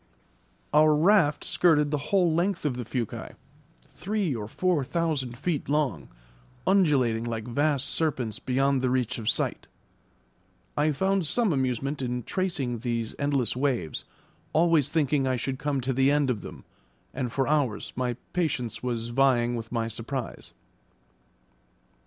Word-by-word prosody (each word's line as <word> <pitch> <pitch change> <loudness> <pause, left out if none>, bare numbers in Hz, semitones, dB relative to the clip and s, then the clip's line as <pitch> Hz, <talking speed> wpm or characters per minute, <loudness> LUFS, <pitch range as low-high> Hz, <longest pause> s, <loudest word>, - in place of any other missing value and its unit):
Our 155 0 +6
raft 160 -2 +4
skirted 150 -4 +3
the 150 - 0
whole 180 -5 +3
length 175 +1 0
of 140 -4 0
the 125 -1 -5
fuci, 120 -2 -4 0.6
three 200 -5 -1
or 105 -2 -5
four 175 - 0
thousand 140 -6 -2
feet 150 +2 -2
long, 135 - 0 0.6
undulating 140 - +3
like 115 -2 -3
vast 140 +2 +2
serpents 130 -9 -1
beyond 135 +1 +1
the 130 - +1
reach 125 -1 0
of 110 0 -1
sight; - - -1 1.1
I 150 +1 +2
found 190 +3 +1
some 220 +2 +2
amusement 135 +1 -1
in 125 -1 -2
tracing 145 - -2
these 115 -1 -2
endless 140 -6 +1
waves, 125 - -1 0.5
always 160 -4 +3
thinking 145 -3 +1
I 130 - +1
should 130 +2 -3
come 145 -2 -1
to 130 +2 -1
the 135 +2 +3
end 145 -2 +2
of 110 -5 -3
them, - - -10 0.5
and 125 -3 -3
for 135 +1 0
hours 140 -8 0
my 125 -1 -1 0.2
patience 135 - -1
was 120 -2 -3
vying 120 -1 +2
with 115 -1 -6
my 115 -2 -1
surprise. 120 +3 -5
135 Hz, 145 wpm, -27 LUFS, 120-155 Hz, 1.1 s, Our